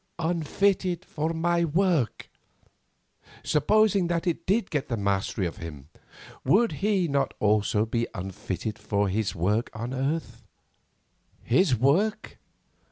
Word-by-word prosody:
"Unfitted 175 +2 0
for 155 +2 -2
my 170 +1 +1
work." 170 - 0 1.1
Supposing 200 +4 +3
that 170 -1 -1
it 170 -1 -2
did 200 +1 +1
get 145 -3 -1
the 115 - -2
mastery 100 -1 -1
of 85 - -4
him, 75 -4 -9 0.5
would 230 +5 +3
he 195 -3 +1
not 140 -2 0
also 105 0 +2
be 115 +1 -1
unfitted 95 +2 -5
for 100 -1 0
his 105 +1 -1
work 105 +7 0
on 115 +3 -4
earth? 140 +5 -2 1.0
His 135 +2 +3
work? 160 - +1
145 Hz, 120 wpm, -26 LUFS, 105-175 Hz, 1.1 s, Supposing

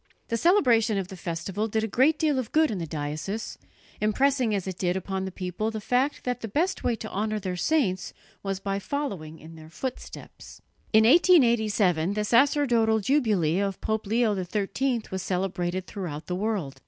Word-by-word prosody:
The 230 - 0
celebration 235 - +3
of 190 -2 -3
the 190 - -8
festival 185 +4 -3
did 220 0 -1
a - - 0
great 265 +9 +3
deal 300 -4 +1
of 240 -3 -5
good 315 -3 +3
in 200 - -3
the 165 - -4
diocese, 155 +8 -4 0.4
impressing 250 +1 +2
as 195 - -2
it 190 -2 -6
did 180 0 0
upon 190 0 -3
the 190 - -5
people 185 +4 -3
the 220 -1 -4
fact 250 +7 0
that 250 -1 -2
the 225 - -4
best 340 - -1
way 240 - +1
to 220 0 -8
honour 215 +2 -1
their 185 -2 -4
saints 195 - 0 0.3
was 195 -1 -3
by 195 0 -2
following 195 - -4
in 160 +1 -13
their 160 -1 -12
footsteps. 255 +10 -8 0.3
In 220 0 +6
1887 220 - +4
the 210 - 0
sacerdotal 235 -3 +3
jubilee 205 - +1
of 195 -2 -2
Pope 220 -1 -2
Leo 225 0 +2
XIII 210 +6 -1
was 190 0 -3
celebrated 180 -1 -2
throughout 170 -7 -6
the 180 - -4
world. 185 -9 -2
210 Hz, 180 wpm, -26 LUFS, 185-240 Hz, 0.4 s, In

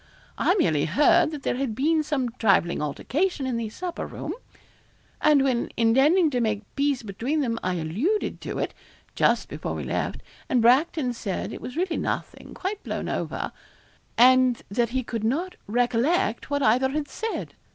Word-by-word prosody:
I 365 - +3
merely 160 - +2
heard 300 - +4
that 300 -3 -7
there - - -1
had 260 -5 -2
been 310 +5 +2
some 280 -5 -1
trifling 195 -7 +3
altercation 275 - -1
in 255 -2 -1
the 230 -2 -3
supper 350 +9 -5
room; - - -5 0.9
and 295 -3 +5
when, 255 -3 0
intending 280 +9 +4
to 250 -2 0
make 215 -2 0
peace 280 -3 +1
between 235 +9 -2
them, 230 -4 -1
I 185 0 -1
alluded 210 - -1
to - - -5
it, - - -2 0.4
just - - +2
before - - -5
we - - -4
left, - - -2 0.3
and 255 - +3
Bracton 255 +2 +3
said 205 -5 -4
it - - -8
was 250 - -7
really 355 -1 0
nothing - - -4
quite 395 +2 -4
blown - - -4
over - - -3 0.7
and 255 0 +5
that 235 +2 +1
he 260 +2 -1
could 230 -2 -4
not 320 +12 -1
recollect 240 - +1
what 285 -1 0
either 255 +4 +3
had 290 +1 -2
said. 445 +8 -4
255 Hz, 170 wpm, -25 LUFS, 230-305 Hz, 0.9 s, and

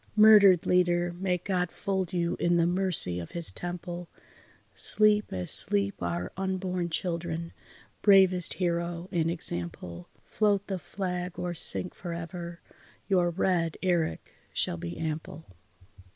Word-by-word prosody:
Murdered 210 -5 +7
leader 175 -1 +1
may 185 -1 0
God 180 -1 -2
fold 190 -3 -3
you 170 -2 -1
in 175 0 +2
the 170 - +3
mercy 175 - +1
of 85 - -9
His 170 -1 +1
temple, 175 0 -7 0.6
Sleep 210 -1 +4
as 90 -1 -1
sleep 100 -1 +3
our 85 +1 -3
unborn 185 -2 -3
children, 170 -1 -4 0.5
bravest 190 -3 +4
hero 170 0 -2
and 165 -2 0
example 85 - -3 0.2
Float 205 -2 0
the 190 -2 -4
flag 180 -2 -5
or 175 -1 -3
sink 175 +2 +1
for 175 -2 -7
ever, 170 0 -7 0.5
your 180 -3 +2
red 170 -2 -1
eric 170 - -1 0.2
shall 85 - 0
be 85 +1 -7
ample. 160 0 -5
175 Hz, 130 wpm, -28 LUFS, 165-185 Hz, 0.6 s, Murdered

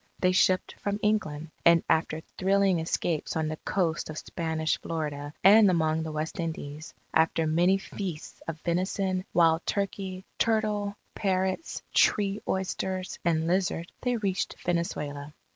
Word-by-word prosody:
They 185 - +3
shipped 185 0 +3
from 205 0 -2
England. 160 -8 0
And 170 -1 +6
after 160 0 +1 0.2
thrilling 195 -1 +3
escapes 160 0 -1
on 160 -1 0
the 155 - -4
coast 170 -4 -1
of 155 - -6
Spanish 160 -1 -2
Florida 150 -3 -4
and 205 +1 +8
among 160 -2 +2
the 160 0 -4
West 155 +2 -4
Indies, 160 -2 -5 0.2
after 160 0 +3
many 175 +5 +3
feasts 190 -5 -6
of 165 -1 -4
venison, 185 +2 -1
wild 165 -1 +4
turkey, 195 -1 -2
turtle, 210 -2 +1 0.2
parrots, 190 - -1
"tree 205 0 +3
oysters," 190 0 -2
and 160 -1 +1
lizard, 180 -1 0
they 250 -1 +1
reached 195 -4 -1
Venezuela. 150 -4 -2
175 Hz, 135 wpm, -28 LUFS, 160-195 Hz, 0.2 s, and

